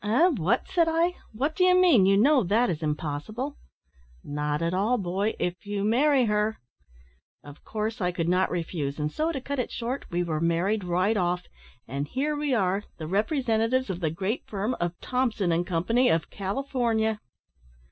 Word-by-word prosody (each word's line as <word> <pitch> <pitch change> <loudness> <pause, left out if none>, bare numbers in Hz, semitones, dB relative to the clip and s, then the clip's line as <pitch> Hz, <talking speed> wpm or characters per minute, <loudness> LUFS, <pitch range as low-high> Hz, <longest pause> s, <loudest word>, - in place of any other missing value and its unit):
"`Eh! 295 - +3
what!' 190 +10 +1
said 340 -3 +2
I, 335 +2 +2 0.2
`what 285 +6 0
do 365 - +1
you 365 0 +5
mean? 290 - +5
You 195 0 +5
know 265 +4 +5
that 220 +4 +2
is 160 -2 -4
impossible.' 160 - -3 0.7
"`Not 150 +2 -2
at 170 +1 0
all, 210 +7 +2
boy, 195 +2 -1
if 180 +3 -3
you 205 -1 -3
marry 260 +4 +3
her!' 210 0 0 0.9
"Of 145 0 -13
course 220 +1 -3
I 180 0 +1
could 170 -2 -2
not 180 +2 +2
refuse, 165 -5 -3
and 150 0 -2
so, 315 - -1
to 285 - -3
cut 280 +1 -4
it 250 - -1
short, 250 +3 -4
we 175 0 0
were 160 -2 -2
married 175 +5 +1
right 180 +5 +1
off 180 -2 0 0.4
and 140 +4 -3
here 290 - -1
we 295 -1 -1
are, 195 -4 +1
the 160 - -6
representatives 225 - +1
of 175 - -5
the 165 -3 0
great 190 +9 -2
firm 210 +4 -2
of 175 0 -2
Thompson 235 -8 0
and 170 +1 0
Company, 225 +9 +2
of 160 -1 0
California." 220 0 -1
210 Hz, 180 wpm, -26 LUFS, 175-255 Hz, 0.9 s, you